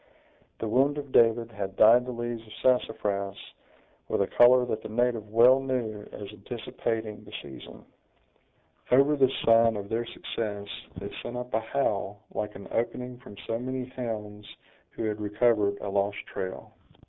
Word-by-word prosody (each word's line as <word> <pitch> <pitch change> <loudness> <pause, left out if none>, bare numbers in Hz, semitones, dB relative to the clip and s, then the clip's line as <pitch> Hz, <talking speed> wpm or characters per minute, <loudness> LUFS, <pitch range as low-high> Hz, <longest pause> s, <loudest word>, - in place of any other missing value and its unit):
The 115 - -3
wound 135 +6 +2
of 140 -2 -6
David 115 0 +4
had 100 -3 -5
dyed 120 +4 +6
the - - -3
leaves 120 -1 -4
of 110 - -11
sassafras 100 -6 +1 0.7
with - - +1
a - - -7
color 125 +1 +7
that 110 -3 -3
the - - -8
native 115 -1 0
well 120 +4 +7
knew 125 -6 -2
as 100 - -7
anticipating 110 0 -4
the 105 - -14
season. 70 -2 -11 1.0
Over 140 +4 +5
this 135 -2 +4 0.2
sign 115 0 +5
of 100 -1 -5
their 115 +1 -1
success, 105 -4 -4 0.3
they - - -6
sent 120 - -6
up 125 0 -6
a 110 - +3
howl, 110 -4 -2
like 105 0 -4
an 100 - -9
opening 125 +2 -2
from 115 -6 -13
so 115 0 -2
many 130 0 -4
hounds 105 -5 -6 0.4
who - - -6
had 105 -1 -2
recovered 105 -1 +2
a 100 - -3
lost 100 +1 0
trail. 95 0 -6
115 Hz, 160 wpm, -28 LUFS, 105-125 Hz, 1.0 s, color